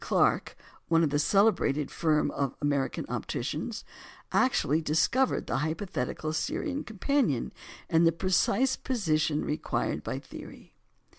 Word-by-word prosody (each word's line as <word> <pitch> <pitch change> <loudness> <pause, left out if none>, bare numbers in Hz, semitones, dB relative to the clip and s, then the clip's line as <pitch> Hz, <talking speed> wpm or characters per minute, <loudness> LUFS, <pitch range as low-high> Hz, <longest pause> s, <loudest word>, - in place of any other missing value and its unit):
Clark - - +1 0.3
(one 165 0 +3
of 150 - +1
the 145 - +1
celebrated 155 -6 +2
firm 155 -3 +1
of 140 -2 -2
American 145 -2 -1
opticians) - - -4 0.5
actually 155 +5 +2
discovered 165 - +1
the - - -1
hypothetical 155 -1 -3
Sirian 280 - -2
companion 220 - 0 0.3
in 165 +1 +3
the 165 - +5
precise 195 +8 +2
position 155 - 0
required 150 - -2
by - - -4
theory. - - -11
160 Hz, 120 wpm, -29 LUFS, 150-205 Hz, 0.5 s, the